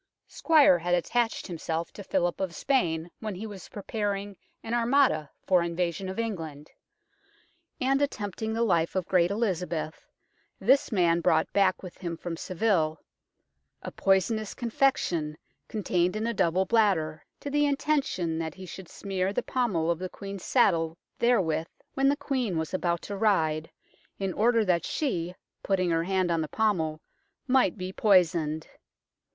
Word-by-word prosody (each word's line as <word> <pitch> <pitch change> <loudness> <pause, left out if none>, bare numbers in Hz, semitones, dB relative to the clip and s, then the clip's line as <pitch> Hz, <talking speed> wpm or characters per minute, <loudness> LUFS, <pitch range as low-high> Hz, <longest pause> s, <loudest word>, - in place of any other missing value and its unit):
Squyer 300 - +5
had 175 +1 +1
attached 225 +6 0
himself 165 -2 -4
to 200 - -8
Philip 175 -2 0
of 185 -3 -3
Spain 170 -11 0
when 215 -3 -4
he 205 +5 -6
was 200 -5 -9
preparing 205 -1 -3 0.3
an 225 - -4
Armada 240 - +3 0.2
for 180 -2 +4
invasion 170 +2 -2
of 190 - -6
England, 165 -10 -4 1.1
and, 270 +2 +2
attempting 220 -5 -2
the 225 +1 0
life 170 -6 +1
of 185 -2 -1
great 175 -2 +3
Elizabeth, 180 -7 -2 0.5
this 275 -1 +3
man 170 -4 +3
brought - - +2
back 195 -2 +2
with 180 - -10
him 170 -2 -4
from 170 0 -5
Seville 170 -3 0 0.4
" - - -52
a - - -5
poisonous 200 +3 +1
con 240 -2 -4
fection, 170 - +1 0.3
contained 180 -3 0
in 215 +1 -2
a 235 - 0
double 185 -1 +2
bladder, 185 -9 +2 0.2
to 285 - -6
the 295 0 +3
intention 275 - 0
that 160 -1 -4
he 190 - -9
should 185 0 -9
smere 190 -1 -2
the - - -1
pommel 195 -11 0
of 170 - -2
the 185 0 -4
Queen's 195 -1 -8
saddle 165 -1 +2 0.2
therewith 180 -10 +2 0.3
when 275 0 +3
the 285 - +3
Queen 250 - -1
was 160 +1 -3
about 175 -2 0
to 205 - -5
ride, 160 -7 +1 0.5
in 195 -2 -2
order 230 +2 +3
that 175 -3 +2
she, 180 - -2 0.3
putting 185 -3 +1
her 165 0 +1
hand 185 -1 +1
on 165 -1 +1
the 155 - -2
pommel, 165 -7 0 0.5
might 260 -3 +3
be 185 0 -5
poisoned." 170 -7 +2
185 Hz, 155 wpm, -28 LUFS, 170-220 Hz, 1.1 s, Squyer